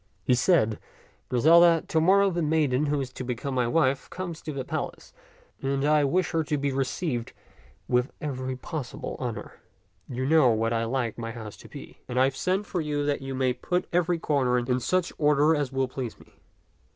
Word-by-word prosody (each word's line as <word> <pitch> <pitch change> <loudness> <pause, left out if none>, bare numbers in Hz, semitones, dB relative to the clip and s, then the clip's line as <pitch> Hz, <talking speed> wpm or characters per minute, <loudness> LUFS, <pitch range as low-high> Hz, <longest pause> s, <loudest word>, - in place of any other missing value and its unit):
He 125 - +3
said, 125 - +3 0.3
" - - -35
Griselda, 165 +6 +5
to 160 -5 +1
morrow 195 +3 +4
the 175 -1 -1
maiden 150 -3 +1
who 145 0 0
is 130 -1 -6
to 130 - -6
become 125 +2 -4
my 125 -2 +1
wife 135 -1 +1
comes 175 -3 -6
to 155 - -5
the 135 -3 -4
palace, - - -5 0.5
and 135 +1 0
I 150 0 +4
would 140 - 0
wish 180 -1 +1
her 165 -1 +1
to 150 0 -1
be 140 0 -1
received 135 -1 -2 0.5
with 125 +1 +1
every 130 -4 -3
possible 150 -1 -6
honor. 120 -3 -5 0.5
You 130 +1 -3
know 135 -6 +4
how 115 +1 0
I 115 0 0
like 120 -2 -2
my 115 0 -4
house 110 -3 -8
to - - -14
be, - - -11
and 125 0 -1
I - - +6
have 135 0 +1
sent 190 +7 0
for 180 - -2
you 145 -1 -1
that 145 -1 0
you 135 0 -5
may 130 -1 +1
put 180 +8 -2
every 175 0 +2
corner 135 -6 +1
in 125 +1 0
such 175 +7 0
order 150 +1 +4
as 145 -3 -1
will 135 -1 0
please 125 -3 -6
me." - - -19
140 Hz, 205 wpm, -26 LUFS, 125-160 Hz, 0.5 s, I